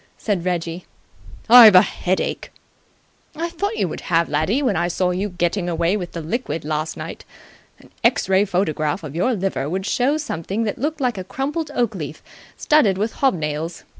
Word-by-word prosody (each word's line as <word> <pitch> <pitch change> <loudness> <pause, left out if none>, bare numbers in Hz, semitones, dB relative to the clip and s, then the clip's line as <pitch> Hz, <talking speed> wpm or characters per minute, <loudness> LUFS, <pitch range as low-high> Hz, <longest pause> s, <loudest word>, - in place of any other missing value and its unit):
said 200 -6 -2
Reggie. 175 -1 -3 0.6
"I've 230 -4 +10
a 185 - +9
headache." 185 +1 -2 0.8
"I 335 +2 -3
thought 405 +6 -3
you - - +1
would 155 - -6
have, 170 -1 +2
laddie, 160 - 0
when 240 -7 +1
I 170 +1 +1
saw 180 +1 0
you 190 +3 -2
getting 175 0 -1
away 170 +3 +1
with 180 -4 -5
the 170 - -5
liquid 165 - -3
last 155 +1 -3
night. - - -7 0.5
An - - -20
X - - +2
ray 190 +1 +4
photograph 175 -4 -1
of 150 -1 -7
your 235 +9 +1
liver 190 -7 -2
would 190 +3 -3
show 260 +7 +1
something 210 - -3
that 210 - -3
looked 300 +3 -2
like 245 -6 0
a - - -4
crumpled 290 - -3
oak 240 -3 +1
leaf 155 -5 -7 0.3
studded 225 -11 +3
with 215 +3 -1
hob 270 -7 +3
nails. 155 +1 -4
185 Hz, 185 wpm, -21 LUFS, 170-235 Hz, 0.8 s, I've